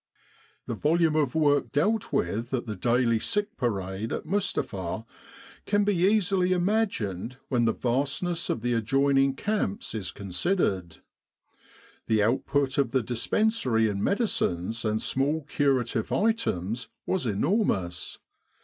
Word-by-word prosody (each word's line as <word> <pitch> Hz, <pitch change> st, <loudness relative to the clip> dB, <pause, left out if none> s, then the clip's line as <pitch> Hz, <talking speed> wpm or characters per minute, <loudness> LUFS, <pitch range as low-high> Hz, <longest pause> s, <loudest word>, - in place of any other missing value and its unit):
The -, -, -3 dB
volume 160 Hz, +1 st, +2 dB
of 145 Hz, -4 st, +1 dB
work 145 Hz, -3 st, +2 dB
dealt 195 Hz, +10 st, +1 dB
with 115 Hz, +9 st, -1 dB
at 125 Hz, -, -3 dB
the 110 Hz, -2 st, -4 dB
daily 115 Hz, +2 st, +2 dB
Sick 205 Hz, -, -1 dB
Parade 100 Hz, -3 st, -2 dB
at -, -, -3 dB
Mustapha 115 Hz, -, -2 dB, 0.6 s
can 205 Hz, 0 st, +3 dB
be 205 Hz, 0 st, +2 dB
easily 185 Hz, 0 st, +3 dB
imagined 175 Hz, -, -1 dB
when 120 Hz, -3 st, +2 dB
the 115 Hz, -, +3 dB
vastness 140 Hz, +9 st, -1 dB
of 115 Hz, -, -1 dB
the 120 Hz, +1 st, 0 dB
adjoining 135 Hz, +4 st, +2 dB
camps 200 Hz, -, -2 dB
is 105 Hz, -5 st, -3 dB
considered. 95 Hz, -, -1 dB, 1.0 s
The 110 Hz, -2 st, +3 dB
output 135 Hz, +4 st, +1 dB
of 135 Hz, -4 st, +2 dB
the 130 Hz, 0 st, +1 dB
dispensary 125 Hz, -, +1 dB
in 100 Hz, -1 st, -2 dB
medicines 115 Hz, -, 0 dB
and 110 Hz, 0 st, +1 dB
small 145 Hz, +7 st, 0 dB
curative 135 Hz, -6 st, 0 dB
items 125 Hz, -, 0 dB, 0.2 s
was 185 Hz, -9 st, 0 dB
enormous. 100 Hz, -, 0 dB
130 Hz, 125 wpm, -27 LUFS, 110-175 Hz, 1.0 s, can